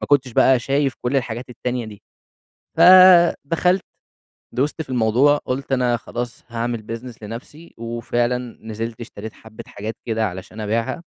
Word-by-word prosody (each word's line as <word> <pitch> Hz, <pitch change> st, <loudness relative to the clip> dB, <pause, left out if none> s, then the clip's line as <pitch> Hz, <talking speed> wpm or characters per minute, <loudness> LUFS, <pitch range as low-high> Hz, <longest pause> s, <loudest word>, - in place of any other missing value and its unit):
ما -, -, -4 dB
كنتش 135 Hz, -4 st, +2 dB
بقى 130 Hz, +1 st, +5 dB
شايف 135 Hz, +2 st, 0 dB
كُلّ 125 Hz, +3 st, 0 dB
الحاجات 120 Hz, 0 st, -3 dB
التانية 125 Hz, 0 st, -3 dB
دي، 105 Hz, -1 st, -12 dB, 0.8 s
فدخَلت 180 Hz, -1 st, +6 dB, 0.7 s
دُست 145 Hz, +5 st, -1 dB
في 145 Hz, -, -16 dB
الموضوع، 125 Hz, +4 st, +3 dB
قُلت 135 Hz, -1 st, -4 dB
أنا 125 Hz, -2 st, +2 dB
خلاص 120 Hz, +1 st, -6 dB
هاعمل 120 Hz, 0 st, -3 dB
business 115 Hz, +1 st, -6 dB
لنَفْسي، 125 Hz, +10 st, -10 dB
وفعلًا 120 Hz, +1 st, -2 dB
نزِلت 110 Hz, +1 st, -6 dB
اشتريت 110 Hz, -2 st, -8 dB
حبّة 110 Hz, -1 st, -13 dB
حاجات 110 Hz, +2 st, -7 dB
كده 110 Hz, -1 st, 0 dB
علشان 95 Hz, +4 st, -8 dB
أبيعها، 115 Hz, +9 st, -2 dB
120 Hz, 140 wpm, -21 LUFS, 115-135 Hz, 0.8 s, فدخَلت